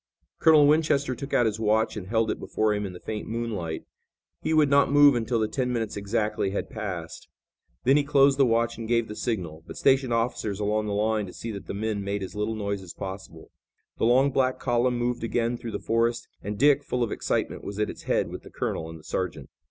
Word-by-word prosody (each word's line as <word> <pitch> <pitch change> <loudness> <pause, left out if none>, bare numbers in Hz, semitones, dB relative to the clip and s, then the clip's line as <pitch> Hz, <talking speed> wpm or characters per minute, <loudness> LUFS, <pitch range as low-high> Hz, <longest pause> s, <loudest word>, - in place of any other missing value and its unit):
Colonel 155 -2 +6
Winchester 145 -3 +3
took 140 +3 -7
out 120 - +3
his 110 -1 -1
watch 110 +1 +1
and 100 -4 -6
held 110 +1 +1
it - - -4
before 110 -1 0
him 105 -1 -2
in 95 - -8
the 90 - -10
faint 110 -1 -5
moonlight. 110 -9 -3 0.6
He - - -2
would 155 -2 +5
not 140 0 +4
move 145 0 +7
until 120 0 0
the 110 - +1
ten 125 +2 -1
minutes 115 -3 -2
exactly 105 0 -1
had 100 - -4
passed. 90 -7 -6 0.6
Then 135 +3 +5
he 145 - +3
closed 140 -1 +4
the - - +7
watch 115 0 +1
and 115 - -5
gave 115 -1 +1
the 105 - -7
signal, 85 -11 -3
but - - -9
stationed 135 -2 +3
officers 115 -3 -1
along 105 +1 0
the 105 - -2
line 105 0 0
to 90 - -10
see 115 - -6
that 100 -2 -8
the - - -4
men 105 -1 -2
made 100 0 -2
as 95 - -7
little 105 +1 -2
noise 100 -2 -3
as 90 -2 -10
possible. 95 -4 -8 0.5
The - - +2
long 130 +4 +4
black 130 -1 +1
column 120 0 +1
moved 120 0 -1
again 115 +1 0
through 120 -1 -6
the - - -1
forest 115 +1 0
and 105 +1 -4
Dick, 145 +2 +4
full 125 -3 -1
of 115 - -2
excitement - - -2
was 100 0 -6
at 105 0 +1
its - - -12
head - - 0
with - - -7
the - - -13
colonel 80 - -3
and 80 - -8
the 80 - -16
sergeant. 80 -8 -4
110 Hz, 230 wpm, -26 LUFS, 100-125 Hz, 0.6 s, move